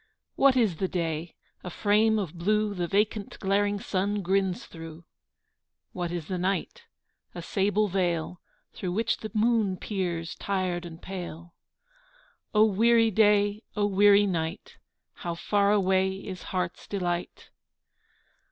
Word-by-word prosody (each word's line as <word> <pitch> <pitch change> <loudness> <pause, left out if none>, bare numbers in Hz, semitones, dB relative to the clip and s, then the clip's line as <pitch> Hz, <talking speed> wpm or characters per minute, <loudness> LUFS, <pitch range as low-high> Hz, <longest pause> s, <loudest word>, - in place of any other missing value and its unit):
What 275 -1 +4
is 215 -9 +2
the 190 - 0
day? 165 -2 -3 0.3
A 180 - -5
frame 215 +4 +2
of 185 -7 -3
blue 210 +4 0
The 175 -3 -2
vacant 205 +2 0
glaring 205 +1 +1
sun 200 +1 -1
grins 190 0 0
through. 165 0 -10 0.9
What 175 -2 -3
is 175 -3 -4
the 185 -1 -3
night? 195 - -2 0.5
A 175 - -5
sable 205 +3 +1
veil 175 -2 -1 0.3
Through 180 -2 -4
which 225 +4 0
the 220 - -7
moon 215 -4 +2
peers 175 -5 -3
tired 185 -3 -2
and 165 -1 -11
pale. 175 -3 -7 1.0
O 215 0 +5
weary 225 +2 +4
day! 205 0 +3
O 205 -1 +1
weary 205 +1 +5
night! 165 -1 -3 0.4
How 170 -1 -4
far 200 +3 +2
away 190 -2 +2
is 190 -1 -8
heart's 180 -2 -3
delight! 175 -3 -3
195 Hz, 135 wpm, -27 LUFS, 175-205 Hz, 1.0 s, O